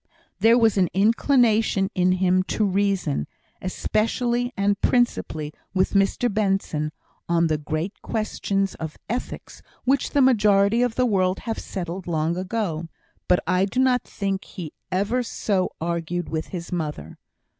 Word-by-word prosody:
There 230 +2 +6
was 225 -4 +3
an 180 -3 +3
inclination 220 -2 +3
in 180 0 +3
him 185 0 +3 0.2
to 215 - +3
reason, 195 - 0 0.3
especially 240 +6 0
and 200 0 +1
principally 155 -11 0 0.2
with 185 0 +2
Mr 195 +4 +2
Benson, 195 -7 0 0.4
on 170 0 +3
the 155 -2 0
great 155 +6 -4
questions 200 -3 -1
of 160 -1 -7
ethics 245 +3 -5 0.2
which 270 +1 +1
the 285 - +2
majority 210 -3 +4
of 245 -2 +1
the 255 - +2
world 190 -4 +1
have 225 -2 -3
settled 180 -1 -5
long 165 0 0
ago. 180 -3 -2 0.4
But 180 - +4
I 185 +3 +2
do 205 +6 -2
not 255 -2 +3
think 195 -1 -3
he 170 -5 -8 0.2
ever 205 +7 +1
so 200 -5 -1
argued 170 +1 -2
with 160 -1 -3
his 175 -2 -7
mother. 150 - -4
195 Hz, 145 wpm, -24 LUFS, 175-225 Hz, 0.4 s, There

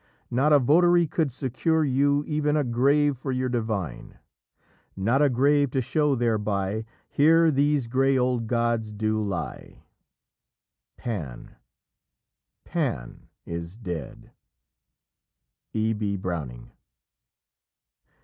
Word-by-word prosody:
Not 135 +5 +2
a 150 - +8
votary 170 +6 +4
could 155 -1 -1
secure 140 +6 0
you 140 +1 +2
Even 150 -1 0
a 150 - +2
grave 140 +3 +2
for 135 0 -4
your 130 0 -1
Divine! 105 - -4 0.8
Not 115 +9 +1
a 145 - +4
grave 140 +3 +3
to 135 - +1
show 145 +2 +1
thereby, 110 -3 -1 0.2
'Here 160 +2 +4
these 145 -1 +1
grey 135 +3 +2
old 125 -2 0
gods 115 -2 0
do 110 +1 -1
lie,' 100 -5 -5 1.1
Pan, 80 - -6 1.1
Pan - - -4 0.2
is 85 +3 -6
dead." 90 - -7 1.4
E. 110 +1 0
B. 105 -2 -2
Browning. 75 -11 -5
125 Hz, 105 wpm, -25 LUFS, 105-145 Hz, 1.4 s, a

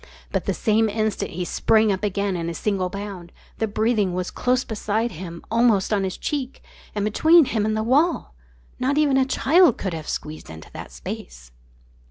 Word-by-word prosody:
But - - -1
the - - 0
same 220 0 +2
instant 215 0 -1
he 180 +2 -4
sprang 220 +4 +3
up 190 +1 -2
again 200 -1 0
in 170 -1 -3
a 170 - -5
single 190 0 -1
bound. 195 -3 -7 0.3
The 220 - +1
breathing 215 -3 +1
was 180 0 -3
close 250 +1 +1
beside 220 +1 -2
him, 170 0 -8
almost 225 -3 +3
on 200 -2 +1
his 185 -1 -3
cheek, 275 -3 -4 0.3
and 205 -1 0
between 315 +9 +5
him 215 -4 0
and 215 0 0
the 220 - 0
wall! 285 - +1 0.5
Not 265 +3 0
even 295 -3 +3
a 265 0 +4
child 290 +2 +4
could 190 -3 -3
have 160 -2 -6
squeezed 155 +1 -5
into 80 0 -11
the - - -8
space. - - -9
210 Hz, 190 wpm, -23 LUFS, 185-240 Hz, 0.5 s, between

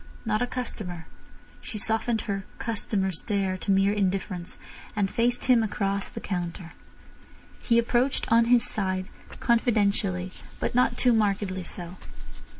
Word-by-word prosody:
Not 215 0 +1
a 245 - +1
customer. 205 -10 -4 0.6
She 225 - -6
softened 225 +1 +1
her 195 -1 -3
"customer 205 -4 -1
stare" 195 +1 -1
to - - -5
mere 195 +1 +4
indifference, 185 -3 -2 0.4
and 200 -2 +1
faced 245 +1 +1
him 250 -3 +5
across 200 -2 -1
the - - -7
counter. 175 -2 -4 0.9
He 235 - +3
approached, 240 +3 +2
on 230 0 +6
his 240 0 +5
side, 190 -2 -2 0.3
confidentially, 200 -6 +2 0.3
but - - -1
not 245 0 +3
too 250 -1 +4
markedly 200 -3 +1
so. 175 +1 -6
205 Hz, 135 wpm, -27 LUFS, 190-230 Hz, 0.9 s, on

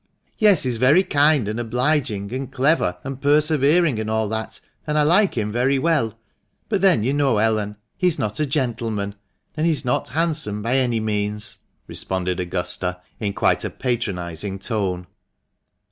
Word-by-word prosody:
"Yes, 210 -6 +5
he's 125 -3 0
very 140 +10 +5
kind, 145 - +3
and 110 +2 -3
obliging, 120 -3 0
and 135 0 -4
clever, 130 - +1
and 135 0 -6
persevering, 150 -1 +3
and 110 0 -3
all 110 0 0
that, 110 0 -4 0.3
and 150 0 0
I 150 - +4
like 180 +2 +3
him 105 -1 -1
very 125 +4 +2
well; 130 -7 0 0.5
but 205 -4 0
then 185 - +4
you 130 +4 +1
know, 140 -5 +2
Ellen, 105 -1 0 0.2
he 180 - +3
is 175 - +2
not 105 +4 -2
a 150 - +1
gentleman, 115 -7 -2 0.4
and 155 +1 +1
he - - +4
is 145 -3 0
not 125 - 0
handsome 150 -10 -1
by 120 +3 0
any 120 -3 +1
means," 105 -1 -2 0.3
responded 90 -1 -2
Augusta, 90 0 -2 0.2
in 100 -3 -2
quite - - +2
a - - -2
patronising 95 -6 -3
tone. 95 -4 -2
120 Hz, 165 wpm, -22 LUFS, 105-150 Hz, 0.5 s, Yes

